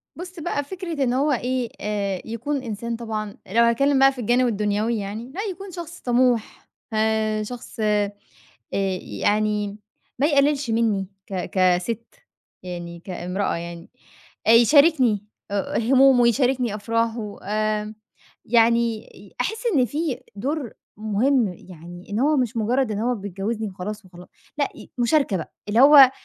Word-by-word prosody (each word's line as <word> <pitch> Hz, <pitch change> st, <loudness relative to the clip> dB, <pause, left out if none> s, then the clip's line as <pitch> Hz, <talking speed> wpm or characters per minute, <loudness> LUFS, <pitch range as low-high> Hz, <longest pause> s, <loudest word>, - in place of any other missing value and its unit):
بُص 360 Hz, +1 st, -8 dB
بقى 305 Hz, -3 st, -2 dB
فكرة 340 Hz, -2 st, -4 dB
إن 245 Hz, -2 st, +1 dB
هُو 280 Hz, +4 st, +2 dB
إيه 250 Hz, -1 st, -1 dB
آآ، 200 Hz, -3 st, -2 dB
يكون 255 Hz, +5 st, -3 dB
إنسان 235 Hz, 0 st, -4 dB
طبعًا 215 Hz, -3 st, -5 dB
لو 230 Hz, +5 st, +3 dB
هاتكلّم 270 Hz, +4 st, +3 dB
بقى 270 Hz, 0 st, +7 dB
في 260 Hz, -2 st, -7 dB
الجانب 245 Hz, +3 st, +3 dB
الدنيوي 210 Hz, +1 st, 0 dB
يعني 215 Hz, +5 st, -5 dB
لأ، 395 Hz, -, -2 dB
يكون 390 Hz, +1 st, -9 dB
شخص 345 Hz, -1 st, -8 dB
طَموح 245 Hz, -2 st, +1 dB, 0.2 s
آآ، 215 Hz, 0 st, +1 dB
شخص 235 Hz, +1 st, -9 dB
آآ، 210 Hz, -1 st, +1 dB, 1.1 s
يعني 210 Hz, -1 st, +1 dB, 0.4 s
ما 285 Hz, -, +4 dB
يقلِّلش 285 Hz, -2 st, +2 dB
مني 220 Hz, -4 st, +1 dB, 0.2 s
ك 190 Hz, -2 st, -4 dB
كسِت 185 Hz, +5 st, +1 dB, 0.5 s
يعني 175 Hz, -1 st, -7 dB
كإمرأة 185 Hz, +1 st, -2 dB
يعني، 170 Hz, 0 st, -7 dB, 0.6 s
أ -, -, +7 dB
يشاركني 245 Hz, -, +5 dB, 0.3 s
أ 200 Hz, -1 st, -1 dB
همومه 260 Hz, +2 st, +5 dB
ويشاركني 245 Hz, -1 st, +2 dB
أفراحه 225 Hz, 0 st, -2 dB
آمم، 215 Hz, +1 st, -1 dB, 0.5 s
يعني 235 Hz, 0 st, +3 dB, 0.2 s
ي 200 Hz, 0 st, -16 dB
أحِس 445 Hz, -, -3 dB
إن 255 Hz, -3 st, +4 dB
في 290 Hz, -1 st, -3 dB
دور 265 Hz, +4 st, -3 dB, 0.2 s
مهم، 220 Hz, +1 st, +1 dB
يعني 175 Hz, 0 st, -12 dB
إن 205 Hz, +2 st, -2 dB
هو 295 Hz, +3 st, +3 dB
مش 245 Hz, -2 st, 0 dB
مجرّد 240 Hz, +2 st, +1 dB
إنه 220 Hz, +4 st, 0 dB
هو -, -, 0 dB
بيتجوّزني 205 Hz, +2 st, -4 dB
وخلاص 200 Hz, +2 st, -6 dB
وخلا 180 Hz, -1 st, -14 dB, 0.3 s
لأ 285 Hz, -, +1 dB
ي -, -, -13 dB
مشاركة 240 Hz, -4 st, +2 dB
بقى 165 Hz, -, -7 dB, 0.2 s
اللي 220 Hz, +3 st, +2 dB
هو 275 Hz, -2 st, +9 dB
230 Hz, 145 wpm, -23 LUFS, 205-260 Hz, 1.1 s, هو